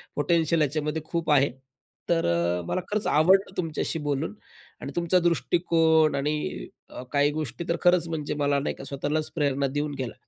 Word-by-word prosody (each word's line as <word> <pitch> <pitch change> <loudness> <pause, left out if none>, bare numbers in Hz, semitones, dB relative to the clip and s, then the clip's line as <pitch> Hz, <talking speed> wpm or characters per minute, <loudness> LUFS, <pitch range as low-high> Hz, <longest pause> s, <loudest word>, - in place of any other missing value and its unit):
Potential 160 +2 +2
याच्यामध्ये 150 +2 -1
खूप 165 -1 -2
आहे. 140 -1 +4 0.6
तर 165 -1 +2 0.3
अ, - - -4
मला 185 - -1
खरंच 210 0 -1
आवडलं 190 +5 +3
तुमच्याशी 165 -1 -2
बोलून 145 +4 -2 0.5
आणि 140 - -5
तुमचा 175 +1 +2
दृष्टिकोन 165 -2 +2
आणि 150 +2 -2 0.2
अ, - - -8
काही 145 0 +3
गोष्टी 155 +1 -4
तर 170 - +2
खरंच 175 -1 +3
म्हणजे 150 -3 -3
मला 140 0 +2
नाही 140 - -3
का - - -10
स्वतःलाच 145 +3 -2
प्रेरणा 140 -3 +1
देऊन 145 +2 -2
गेला 130 -3 -4
155 Hz, 165 wpm, -26 LUFS, 145-170 Hz, 0.6 s, आहे